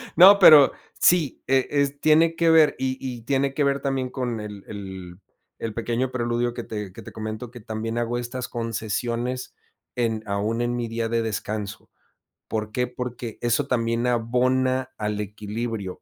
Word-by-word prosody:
No, 200 +3 +9
pero 150 -6 +9 0.3
sí, 170 -7 +3
eh 135 -1 +3
eh, 145 -1 +2
s 140 0 -4
tiene 160 +2 +4
que 165 0 +3
ver. 160 -2 +6
Y 130 0 -1
y 125 -3 -5
tiene 135 +2 0
que 145 - +1
ver 140 -1 +1
también 135 -2 -1
con 125 -4 -3
el 105 -2 -8
el 95 -3 -8 0.4
el 115 -1 -4
pequeño 120 +3 -1
preludio 120 -1 -1
que 120 - -5
te 105 -4 -6
que - - -10
te - - -10
comento, 110 +2 -6
que 120 - -10
también 110 +1 -4
hago 120 0 -1
estas 120 +1 -4
concesiones 115 +2 -3 0.4
en 115 -3 -1
aún 105 +4 -1
en 120 0 0
mi 120 -1 -2
día 115 0 -2
de 115 0 +1
descanso. 105 -2 -4 0.6
¿Por 110 -1 -3
qué? 125 +2 0
Porque 125 -2 -6
eso 120 +4 +1
también 115 -1 0
abona 130 +2 +1
al 105 -1 -2
equilibrio. 105 -1 -5
120 Hz, 170 wpm, -24 LUFS, 110-130 Hz, 0.6 s, No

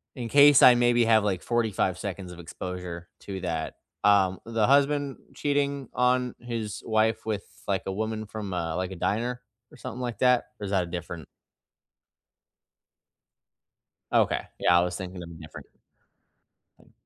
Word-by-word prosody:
in 120 -3 -5
case 145 -1 +7
I 125 - +9
maybe 120 -1 +3
have, 110 -2 +4
like, 95 -4 -1
45 110 -6 0
seconds 95 -2 -6
of 90 - -11
exposure 90 0 -7
to 95 -2 -6
that, 80 -3 -3 0.3
um, 95 -2 +4
the 115 -2 +1
husband 140 0 +2 0.2
cheating 140 -2 -1
on 125 0 +1
his 115 -4 -5
wife 110 0 +1
with, 105 -2 -2 0.2
like, 95 -1 0
a 95 - -2
woman 110 +1 -3
from 105 -3 -6
a, 80 -2 -2
like, 90 +1 -3
a - - -6
diner 120 +7 -2 0.3
or - - -15
something 125 - -7
like 120 -2 -4
that? 125 -1 +4
Or 105 - -5
is 100 - -5
that 95 -3 +2
a - - -7
different 85 -1 -6 2.9
Okay. - - +3 0.2
Yeah, 85 0 +4
I - - +3
was 90 0 -2
thinking 90 -1 -7
of 85 - -9
a - - -10
different 80 -1 -11 1.1
thing. - - -24
105 Hz, 160 wpm, -27 LUFS, 90-120 Hz, 2.9 s, I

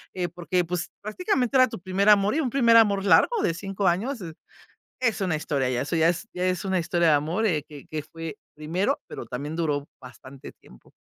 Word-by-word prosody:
eh, 180 -1 -1
porque, 175 +1 -2
pues, 175 0 -3
prácticamente 255 - -1
era 255 0 +6
tu - - -7
primer 190 +3 +1
amor 205 0 +5
y - - +1
un 265 - -1
primer 235 -3 +4
amor 200 -3 +4
largo 455 - +4
de 165 - +1
5 195 +2 -3
años, 230 +10 0
eh, 165 -3 -7 0.7
es 230 -4 0
una 180 -5 0
historia 145 -4 -1
ya, 125 -1 -1
eso 145 - -3
ya 165 0 +4
es 175 +4 -2
ya 180 0 -2
es 185 +1 -1
una 190 -1 0
historia 170 0 +1
de - - +5
amor, 160 +9 0
eh, 160 -8 +1
que 145 -2 -11
que 155 -1 -4
fue 165 0 -8 0.2
primero, 160 +6 -1
pero - - -8
también 140 +6 -5
duró 150 -4 -1
bastante 130 +2 -12
tiempo. 60 - -20
175 Hz, 215 wpm, -25 LUFS, 155-205 Hz, 0.7 s, era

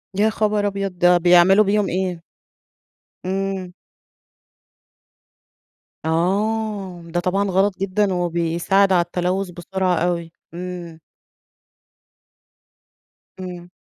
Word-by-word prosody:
يا 210 +3 +3
خبر 210 -1 0
أبيض! 195 -2 -4
ده 175 0 +5
بيعملوا 180 +4 +6
بيهم 205 0 +1
إيه؟ 180 -1 -2 1.0
امم. 190 -1 -3 2.3
آه، 195 +2 -1
ده 175 - +1
طبعًا 195 +3 0
غلط 190 +1 +1
جدًا 195 +1 0
وبيساعد 175 +3 +1
على 175 - +4
التلوث 180 +2 -2
بسرعة 180 +1 -1
أوي. 170 -1 -1 0.2
امم. 175 -2 -7 2.4
امم. 180 -1 -8
185 Hz, 85 wpm, -21 LUFS, 175-195 Hz, 2.4 s, بيعملوا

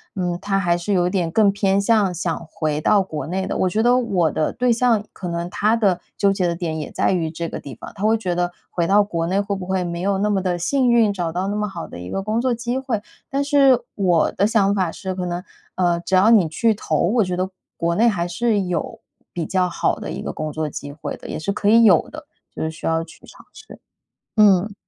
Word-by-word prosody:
嗯， 175 -2 -2
他 200 -1 0
还 175 -3 +2
是 175 +4 -2
有 180 -2 +2
一 - - 0
点 180 -4 0
更 205 +3 +4
偏 195 0 +1
向 205 -2 +3
想 170 -1 -3
回 150 -1 -1
到 200 +4 +3
国 155 -6 -6
内 190 +3 -2
的， - - -3
我 185 - +1
觉 215 +5 0
得 245 +1 +4
我 185 -10 +1
的 155 - 0
对 250 -1 +1
象 230 -3 +2
可 185 - -7
能 170 0 -3
他 215 +2 +2
的 200 -6 +2 0.2
纠 200 - +3
结 185 -3 0
的 170 - -1
点 165 -2 -3
也 150 - -5
在 - - +1
于 170 -4 0
这 165 +1 -4
个 - - -6
地 135 -4 -9
方。 - - -10
他 200 - -8
会 220 +1 +3
觉 185 -5 -2
得 175 0 -1 0.2
回 170 -1 0
到 205 +3 +5
国 170 -5 -2
内 190 +3 +1
会 200 0 -3
不 190 -2 -6
会 190 -1 0
没 170 -1 -4
有 195 +1 +1
那 210 +1 +1
么 195 -2 +1
地 180 -2 -1
幸 250 +9 +1
运， 230 -3 +4
找 175 -4 -2
到 180 +3 -2
那 205 - -2
么 210 0 -1
好 175 -4 -7
的 - - -10
一 90 +1 -8
个 195 - -3
工 215 +3 -1
作 255 0 +1
机 240 +2 -2
会。 245 -6 -3 0.3
但 280 +1 0
是 275 -4 +4
我 180 -5 +2
的 200 - +1
想 200 -3 +2
法 185 -4 0
是 190 +1 -5
可 185 -1 -4
能， 175 +1 -4 0.3
呃， 175 -2 +1
只 185 +2 -1
要 195 +5 +5
你 205 -7 +5
去 225 +8 +2
投， 160 -6 -2
我 225 +1 +3
觉 180 -1 -2
得 185 - 0 0.3
国 170 0 0
内 230 +5 +4
还 175 -6 0
是 210 +4 0
有 185 +4 -3 0.3
比 170 -2 -3
较 185 0 0
好 - - 0
的 - - -6
一 - - -5
个 - - -3
工 155 0 -4
作 155 +1 -2
机 145 0 -7
会 145 +1 -6
的， - - -11
也 - - -4
是 160 +5 -2
可 200 0 0
以 230 +2 +6
有 190 -7 +5
的， 310 0 -10 0.3
就 - - -3
是 160 - -2
需 155 - -6
要 165 0 +1
去 165 - -15
尝 - - -16
试。 - - -13 0.6
嗯。 205 -1 +4
190 Hz, 280 characters per minute, -21 LUFS, 170-215 Hz, 0.6 s, 以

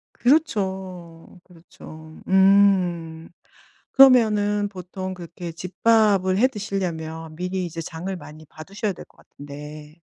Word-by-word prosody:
그렇죠. 190 - -2
그렇죠. 160 -2 -14
음. 185 -4 +3 0.6
그러면은 210 -6 +4
보통 185 0 -7
그렇게 170 0 -8
집밥을 190 +2 +1
해 255 +4 +4
드시려면 165 -8 -5
미리 180 +1 -3
이제 165 0 -6
장을 175 +4 -6
많이 155 -2 -12
봐두셔야 195 +7 -5
될 - - -12
것 - - -30
같은데 150 +1 -11
185 Hz, 245 characters per minute, -23 LUFS, 165-200 Hz, 0.6 s, 그러면은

